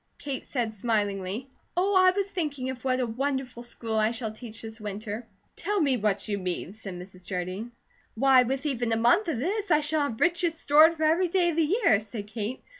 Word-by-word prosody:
Kate 275 -2 -5
said 235 -5 -2
smilingly: 205 +1 -1 0.3
"Oh, 385 +3 +2
I 370 0 +7
was 395 +1 0
thinking 285 -8 -2
of 255 -1 -9
what 255 -1 +1
a 250 - +1
wonderful 255 +1 -2
school 230 -2 -4
I 215 0 +3
shall 230 -1 -3
teach 225 0 -9
this 220 0 -8
winter." 210 +2 -5 0.3
"Tell 415 0 -1
me 280 -6 +3
what 210 -3 0
you 205 -1 -1
mean," 185 0 -3
said 205 -4 -8
Mrs. 185 0 -11
Jardine. 185 +5 -4 0.4
"Why, 260 +2 +6
with 265 +3 -1
even 245 -5 -1
a - - +2
month 345 - +4
of 320 - -1
this, 395 - -2
I 305 -2 +4
shall 300 +1 +1
have 220 - -7
riches 345 -1 +2
stored 315 +3 +6
for 315 - -2
every 330 +4 +3
day 350 0 +2
of - - -5
the 330 +5 +3
year," 220 - +5
said 210 0 -7
Kate. 215 +3 -5
245 Hz, 210 wpm, -27 LUFS, 215-310 Hz, 0.4 s, I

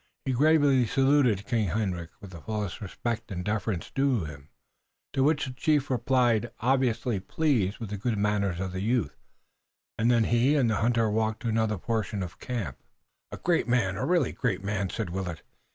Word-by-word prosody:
He 135 - 0
gravely 145 -2 +4
saluted 135 -6 +3
King 110 -2 0
Hendrik 90 -3 -2
with 100 -2 -11
the 85 -3 -10
full 110 +2 -3 0.2
respect 115 +3 -4
and 90 -1 -4
deference 105 -3 -2
due 135 - +1
him, 70 -1 -10 0.6
to 135 - +2
which 145 0 +2
the 130 - -6
chief 145 +1 +1
replied, 120 -2 +2
obviously 125 -3 +1
pleased 110 -4 0
with 110 -3 -7
the 105 - -4
good 110 +1 -1
manners 100 -3 0
of 95 0 -3
the 95 +1 -4
youth, 110 - 0 0.8
and 115 +2 +3
then 120 -2 +4
he 120 +6 +3
and 125 -6 +3
the 110 - +1
hunter 115 0 +2
walked 110 0 -1
to 115 - 0
another 110 -1 +1
portion 105 -1 -2
of 90 - -5
the - - -13
camp. 110 - -4 0.5
"A - - -6
great 175 -6 +1
man, 115 -6 +1
a 95 - -3
really 175 +5 +2
great 100 -7 -2
man!" 100 -1 -1
said 105 -5 -4
Willet. 90 -3 -4
110 Hz, 185 wpm, -28 LUFS, 100-125 Hz, 0.8 s, gravely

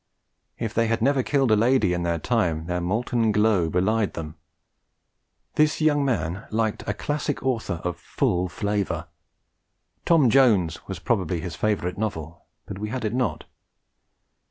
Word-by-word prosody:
If 115 -2 -3
they 115 0 +2
had 115 +1 0
never 135 +1 +3
killed 135 -2 +1
a - - +6
lady 110 -3 +3
in 90 - -1
their 85 -1 0
time, 85 -6 0
their 90 +1 -2
molten 110 +4 0
glow 105 -5 +2
belied 100 +5 +1
them. 75 -2 -6 1.2
This 155 0 +3
young 150 -2 +3
man 100 -8 -2
liked 110 -1 -1
a - - 0
classic 145 -1 -2
author 115 -9 -1
of 90 -1 -2
full 90 0 -1
flavour. 95 -4 -2 0.9
Tom 155 -8 +4
Jones 105 -11 +3
was 95 - -5
probably 90 -3 -1
his 85 -1 -5
favourite 100 -3 -1
novel, 85 -6 -4 0.2
but 95 - -7
we 105 +1 -4
had 125 0 -3
it 110 - -1
not. 120 - -1
105 Hz, 155 wpm, -24 LUFS, 90-120 Hz, 1.2 s, a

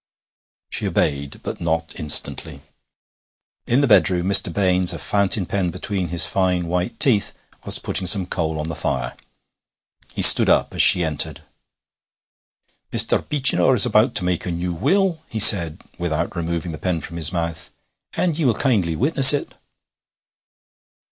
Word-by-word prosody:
She - - -4
obeyed, 70 -1 -4
but - - -8
not 80 -1 -4
instantly. 75 -1 -1 1.1
In 125 +4 0
the 140 - 0
bedroom 90 -5 +1
Mr. 95 -2 +2
Baines, 90 -1 0
a - - -7
fountain 100 +5 -1
pen 95 -1 -3
between 95 +1 -5
his 85 -1 +2
fine 90 +1 -2
white 90 +1 -5
teeth, 110 -7 +1 0.3
was - - +3
putting 95 - -5
some 95 -1 +3
coal 80 -3 -5
on 75 - -6
the 80 - -6
fire. - - -5 1.0
He - - 0
stood - - +9
up - - 0
as - - +1
she 90 - +4
entered. 75 -3 -4 1.5
'Mr. - - 0
Beechinor 135 -2 +1
is 115 - +4
about 115 +1 0
to 95 - 0
make 90 -1 -4
a - - -4
new 85 +1 -5
will,' 185 - -2
he 110 - -6
said, 85 -7 +7 0.2
without 85 0 -4
removing 85 0 -5
the 80 - -10
pen 90 0 -3
from 85 - -10
his 80 -1 +1
mouth, 85 -2 -5 0.4
'and 170 -3 -3
ye 160 - -2
will 120 -4 0
kindly 100 - -2
witness 135 - +6
it.' 145 - -5
90 Hz, 155 wpm, -19 LUFS, 85-105 Hz, 1.5 s, stood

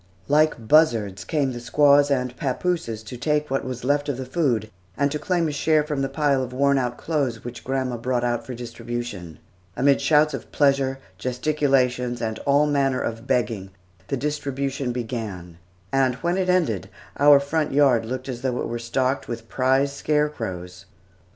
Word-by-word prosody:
Like 150 -6 +2
buzzards 110 -11 +3
came 140 +4 0
the 120 - -6
squaws 145 +3 +4
and 125 -2 0
papooses 130 -5 -2
to 115 +3 -8
take 150 +2 0
what 135 - 0
was 130 -2 -5
left 145 +2 +1
of 135 - -2
the 130 - -5
food, 125 - 0 0.3
and 140 0 +1
to 150 - -2
claim 170 +2 0
a - - -2
share 155 +1 +2
from 150 -2 -2
the 135 - -1
pile 140 -1 +1
of 125 -1 -4
worn 140 +1 +3
out 120 -1 -2
clothes 135 -8 -2
which 120 -1 -7
grandma 130 -2 -2
brought 120 +1 -1
out 120 -1 0
for 125 - -7
distribution. 115 - -6 0.4
Amid 140 +1 +3
shouts 150 0 +4
of - - -7
pleasure, 135 -2 +2 0.2
gesticulations, 125 -1 0
and 110 -1 -3
all 140 +1 +4
manner 140 -3 +1
of 115 +2 -4
begging, 105 -5 0 0.4
the 140 - -1
distribution 140 -2 -2
began, 110 -8 -5 0.3
and 130 -2 +2
when 170 +6 -1
it 185 -1 0
ended, 160 - +1 0.3
our 145 0 +7
front 150 +2 -1
yard 135 -5 +4
looked 130 +3 -5
as 125 -2 -5
though 125 -2 -1
it - - -2
were 120 0 -4
stocked 130 +3 -1
with 115 -1 -6
prize 135 +2 +2
scarecrows. 110 -12 -2
130 Hz, 175 wpm, -23 LUFS, 120-145 Hz, 0.4 s, our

